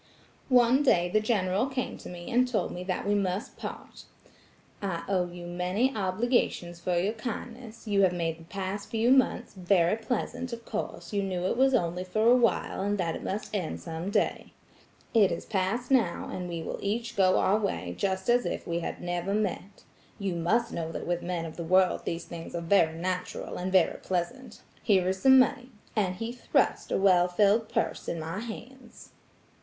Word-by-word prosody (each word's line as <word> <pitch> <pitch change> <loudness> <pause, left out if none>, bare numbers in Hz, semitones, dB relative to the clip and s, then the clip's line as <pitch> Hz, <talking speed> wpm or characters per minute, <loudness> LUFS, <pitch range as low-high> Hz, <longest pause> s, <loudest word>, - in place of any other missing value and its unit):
"One 250 +1 +5
day 175 -11 +3
the 215 - +3
General 210 0 +1
came 260 -2 -3
to - - -9
me 175 -1 -8
and 250 +1 +4
told 250 -3 -1
me 180 - -5
that 185 -1 -2
we 205 - +3
must 195 0 -1
part. - - -8 0.8
'I 180 -4 -2
owe 185 -2 +1
you 175 0 -9
many 180 +9 0
obligations 190 -3 0
for 175 0 0
your 195 +5 +1
kindness. 230 0 -7
You 200 -1 +3
have 190 -2 +5
made 165 -2 -2
the - - -12
past 195 +2 -5
few 230 +2 +2
months 265 -1 +2
very 180 -1 +2
pleasant; 245 +2 -3
of 230 0 -7
course 220 0 -5
you 200 - +1
knew 185 -2 -2
it 185 - +1
was 265 +1 +4
only 175 -4 0
for 215 +4 0
awhile, 235 -6 +2
and 205 +1 0
that 170 -4 -1
it - - -7
must 205 +3 -4
end 180 -6 -2
some 165 +2 -5
day. - - -1 0.6
It 210 -5 +5
is 170 - -4
past 220 +5 -1
now, 230 -10 +2
and 180 -1 -4
we 170 -1 -4
will - - -5
each 230 +4 -2
go 185 -2 +4
our 205 +3 +3
way 200 -2 -2
just 190 -1 -1
as 245 0 +4
if - - -4
we 170 0 -1
had 170 - -5
never 175 +3 -1
met. 205 -1 -3 0.3
You 195 -3 -2
must 220 +8 +1
know 165 -1 -3
that - - -5
with 175 0 -1
men 175 -2 -3
of 160 - -8
the 170 - -4
world 185 +2 +3
these 165 0 -3
things 170 0 -8
are 170 - -2
very 165 -2 +3
natural 180 +1 -3
and 185 +1 -3
very 185 -3 +3
pleasant. 190 +9 -4 0.2
Here 190 -4 +3
is 190 0 -2
some 265 0 +7
money; 255 -1 +3 0.3
and 190 -4 +1
he 225 +5 -4
thrust 245 - 0
a - - +2
well 185 -2 +5
filled 205 +4 +3
purse 230 0 -2
in 170 - -2
my 165 +4 -4
hands. 240 +2 -10
195 Hz, 195 wpm, -28 LUFS, 175-230 Hz, 0.8 s, some